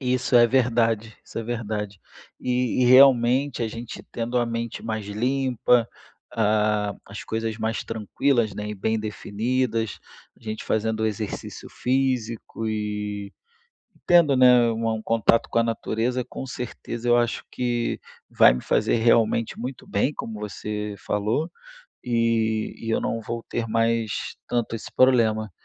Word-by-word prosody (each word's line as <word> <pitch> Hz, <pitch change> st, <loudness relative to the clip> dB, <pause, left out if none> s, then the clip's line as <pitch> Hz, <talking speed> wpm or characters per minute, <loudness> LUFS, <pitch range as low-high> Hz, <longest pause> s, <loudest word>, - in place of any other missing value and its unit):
E 125 Hz, -2 st, 0 dB
isso 125 Hz, 0 st, -1 dB
é 120 Hz, 0 st, +7 dB
verdade, 115 Hz, -3 st, +1 dB
isso -, -, -7 dB
é -, -, -2 dB
verdade. 105 Hz, -4 st, -4 dB, 0.4 s
E 125 Hz, 0 st, 0 dB
e -, -, +4 dB
realmente 130 Hz, 0 st, +5 dB
a 115 Hz, -, -1 dB
gente 115 Hz, +1 st, -8 dB
tendo 120 Hz, +1 st, -3 dB
a 120 Hz, -, +1 dB
mente 115 Hz, 0 st, -4 dB
mais 110 Hz, -2 st, -4 dB
limpa, 125 Hz, +1 st, +1 dB, 0.5 s
a 105 Hz, -2 st, +1 dB
as 100 Hz, +2 st, -8 dB
coisas 110 Hz, 0 st, -3 dB
mais 110 Hz, 0 st, -2 dB
tranquilas, 115 Hz, +1 st, 0 dB
né, 105 Hz, 0 st, -5 dB
e 105 Hz, -, -4 dB
bem 110 Hz, +3 st, -1 dB
definidas, 110 Hz, +2 st, -2 dB, 0.4 s
a -, -, -26 dB
gente 110 Hz, -1 st, -5 dB
fazendo 110 Hz, 0 st, 0 dB
exercício 105 Hz, -1 st, -5 dB
físico 125 Hz, -4 st, -1 dB
e 105 Hz, -1 st, -3 dB, 0.7 s
tendo, 170 Hz, -6 st, +5 dB
né, 125 Hz, -2 st, +6 dB
um 115 Hz, -1 st, -1 dB
contato 115 Hz, 0 st, +2 dB
com -, -, +1 dB
a 115 Hz, -, +5 dB
natureza 115 Hz, +2 st, -1 dB
com 135 Hz, -, -6 dB
certeza 120 Hz, -1 st, -5 dB
eu 120 Hz, -, +6 dB
acho 120 Hz, -1 st, 0 dB
que 120 Hz, -1 st, -1 dB, 0.3 s
vai -, -, +6 dB
me 65 Hz, -, -4 dB
fazer -, -, +1 dB
realmente 115 Hz, -1 st, +2 dB
muito 125 Hz, +1 st, -6 dB
bem, 115 Hz, +9 st, 0 dB
como 110 Hz, -2 st, -6 dB
você 105 Hz, 0 st, -4 dB
falou, 105 Hz, -, -1 dB, 0.5 s
e 115 Hz, -2 st, 0 dB
e 115 Hz, -, -5 dB
eu -, -, +1 dB
não 115 Hz, -, -2 dB
vou 115 Hz, +1 st, -5 dB
ter 120 Hz, -1 st, -2 dB
mais 115 Hz, -1 st, 0 dB
tanto 120 Hz, -2 st, -1 dB
esse 110 Hz, -, -9 dB
problema. 110 Hz, -4 st, +3 dB
115 Hz, 145 wpm, -24 LUFS, 110-120 Hz, 0.7 s, é